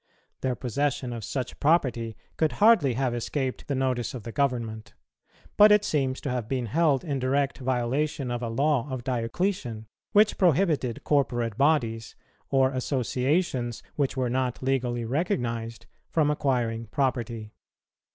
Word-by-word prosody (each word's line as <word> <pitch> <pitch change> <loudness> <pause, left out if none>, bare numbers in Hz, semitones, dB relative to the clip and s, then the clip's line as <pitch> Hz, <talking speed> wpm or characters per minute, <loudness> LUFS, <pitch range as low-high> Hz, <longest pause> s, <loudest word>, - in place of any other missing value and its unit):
Their 130 -1 0
possession 135 0 -2
of 115 -2 -6
such 130 +3 -4
property 125 -8 +1 0.2
could 160 -1 +1
hardly 210 - +4
have 130 -1 0
escaped 130 +2 -3
the 140 - -1
notice 130 -2 -1
of 120 - -7
the 115 - -6
government; 115 -5 -2 0.6
but 210 +1 +8
it 210 0 +5
seems 135 -3 0
to 140 - -3
have 125 -3 -3
been 130 -2 -1
held 145 +2 +2
in 140 -5 -2
direct 135 +2 0
violation 130 +2 -1
of 120 0 -2
a 120 - -2
law 140 +2 +1
of 130 -2 -4
Diocletian, 120 - -2 0.3
which 210 0 +4
prohibited 160 - +2
corporate 120 -6 +1
bodies, 115 -6 +1 0.3
or 135 -1 +3
associations 130 0 -1
which 140 -2 -1
were 130 -1 +1
not 125 0 -1
legally 125 -3 0
recognized, 120 - -2 0.2
from 150 -2 +2
acquiring 120 -6 -1
property. 115 -3 -2
130 Hz, 140 wpm, -27 LUFS, 120-145 Hz, 0.6 s, but